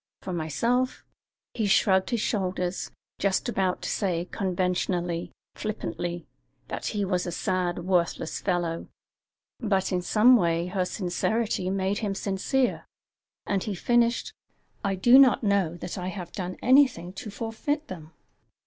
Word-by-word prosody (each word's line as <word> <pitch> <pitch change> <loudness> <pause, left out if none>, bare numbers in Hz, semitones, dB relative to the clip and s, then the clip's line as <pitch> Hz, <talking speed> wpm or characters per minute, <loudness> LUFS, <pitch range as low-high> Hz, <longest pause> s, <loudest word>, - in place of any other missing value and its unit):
For 185 - -4
myself 230 - 0 0.2
" - - -66
He 220 -3 0
shrugged 190 -1 +3
his 235 -4 0
shoulders, 185 -4 -1 0.3
just 195 +4 +1
about 190 -6 0
to - - -2
say 180 -4 -1
conventionally, 180 -2 -1 0.2
flippantly, 175 -5 -4 0.4
that - - -4
he 205 -2 -1
was 180 -1 -1
a - - -2
sad, 175 0 -1
worthless 175 -3 0
fellow, 175 -3 -1 0.7
but 200 -5 0
in 180 -1 +1
some 225 +7 +5
way 170 -3 +1
her 180 0 -1
sincerity 190 +2 -1
made 195 +1 0
him 205 -3 -2
sincere, 210 +7 0 0.6
and 200 -2 0
he 210 - -2
finished: 235 +4 +1 0.5
"I 195 -1 0
do 240 +8 +7
not 265 -3 +6
know 195 -5 +1
that 175 +2 -6
I 180 - -4
have 180 -2 -6
done 185 -2 -5
anything 250 -10 +4
to 215 - -7
forfeit 230 +8 -3
them." 160 -4 -9
190 Hz, 140 wpm, -27 LUFS, 180-215 Hz, 0.7 s, do